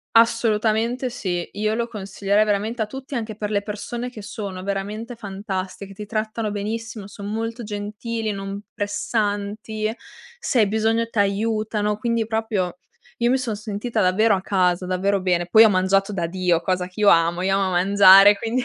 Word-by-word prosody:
Assolutamente 230 +2 +2
sì. 185 -8 -3
Io 215 +1 0
lo 235 +1 -1
consiglierei 200 -1 0
veramente 215 +3 0
a - - -3
tutti 265 +5 -8
anche 220 -3 -4
per 210 0 -4
le 205 -1 0
persone 235 +4 -5
che 220 - -9
sono 200 -2 -6
veramente 205 +5 -4
fantastiche, 195 -2 -5
ti 210 - -7
trattano 215 0 -2
benissimo, 215 0 -5
son 200 0 -7
molto 225 +2 -3
gentili, 215 +2 -4
non 195 0 -5
pressanti 210 0 -2
e 220 +3 -2 0.4
se 255 - 0
hai 215 - +5
bisogno 220 +2 +1
t'aiutano, 210 0 0
quindi 230 0 -1
proprio 220 -6 -1 0.4
io 240 0 +2
mi 260 - +3
son 235 -4 -2
sentita 215 +2 -3
davvero 200 +3 +3
a 190 - -3
casa, 180 -2 +1
davvero 190 +2 0
bene. 175 -2 +1
Poi 220 +4 +8
ho 220 - +6
mangiato 195 +1 +2
da 175 -4 -1
Dio, 175 -1 +1
cosa 180 +1 -1
che 185 +3 -12
io 205 -1 +6
amo, 170 +1 +3
io 195 +1 +2
amo 195 -1 0
mangiare 195 +2 +7
quindi 230 +4 -1
210 Hz, 170 wpm, -22 LUFS, 195-225 Hz, 0.4 s, Poi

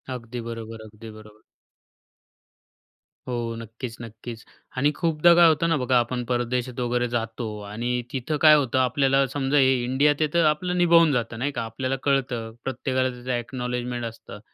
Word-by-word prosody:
अगदी 120 0 -7
बरोबर, 115 -1 -7
अगदी 110 +1 -12
बरोबर. 105 0 -16 1.9
हो. 120 -2 -3
नक्कीच, 115 +1 -8
नक्कीच. 115 0 -9 0.3
आणि 145 +3 +3
खूपदा 165 +1 +4
काय 170 0 +7
होतं 160 +1 +2
ना 165 - +3
बघा, 125 -1 +2
आपण 125 +1 -2
परदेशात 125 +1 -2
वगैरे 125 0 0
जातो 115 -1 -3 0.2
आणि 115 +4 -3 0.2
तिथं 135 +4 -2
काय 155 -1 +8
होतं, 135 -4 +1
आपल्याला 135 +2 +2
समजा 140 0 0
हे 135 -1 +5
इंडियात 135 +4 +2
आहे, 155 - +2
तर 170 -1 +3
आपलं 180 +4 +1
निभावून 170 -2 +5
जातं 115 -2 -2
नाही 140 +4 -1
का. 120 -4 -3
आपल्याला 130 +4 -3
कळतं, 125 -5 0
प्रत्येकाला 130 0 -1
त्याचं 125 0 -6
ॲक्नॉलेजमेंट 125 0 -4
असतं. 115 0 -9
125 Hz, 155 wpm, -24 LUFS, 115-140 Hz, 1.9 s, काय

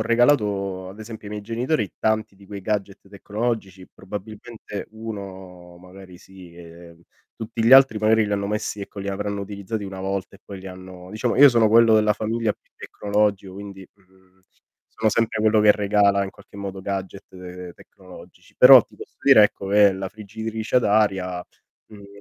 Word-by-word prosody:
regalato 105 -6 +1
ad 95 - -12
esempio 110 -1 -9
ai 105 - -7
miei 105 -1 -7
genitori 115 - -2
tanti 110 -2 -1
di 100 0 -19
quei 100 -1 -8
gadget 100 -1 -4
tecnologici, 100 -2 -4
probabilmente 105 0 -9
1 95 -5 -9
magari 90 0 -14
sì, 95 -3 -15
ehm, 85 0 -14 0.3
tutti 115 0 -5
gli 115 - +5
altri 135 -4 +7
magari 110 +1 +3
li 105 - -3
hanno 100 0 -1
messi 105 0 -3
ecco 100 0 -8
li 100 - -5
avranno 100 +1 -3
utilizzati 100 +2 -6
1 95 -1 -8
volta 95 0 -4
e - - -31
poi 100 -2 -9
li 95 - -11
hanno 95 -1 -11
diciamo, 110 +2 -2
io 145 +1 +9
sono 115 -4 +3
quello 115 0 +5
della 105 -1 +3
famiglia 110 0 -2
più - - -34
tecnologico, 100 -2 -2
quindi, 100 -1 -10
mhmm, 95 -1 -29 0.6
sono 110 -1 +1
sempre 110 0 0
quello 110 0 +3
che 105 0 +6
regala 100 -1 +2
in 95 - -7
qualche 100 - -18
modo 100 -1 -6
gadget, 95 0 -5
uhm, 90 -1 -10
tecnologici. - - -17
Però - - +10
ti - - -23
posso - - -13
dire, 110 - +6
ecco, 100 -1 0
che 100 0 +5
la 95 0 -5
friggitrice 110 +3 -5
ad 125 - +3
aria, 95 -4 0 0.4
mhmm, 105 - -14
io 100 - -13
100 Hz, 180 wpm, -22 LUFS, 95-110 Hz, 0.6 s, Però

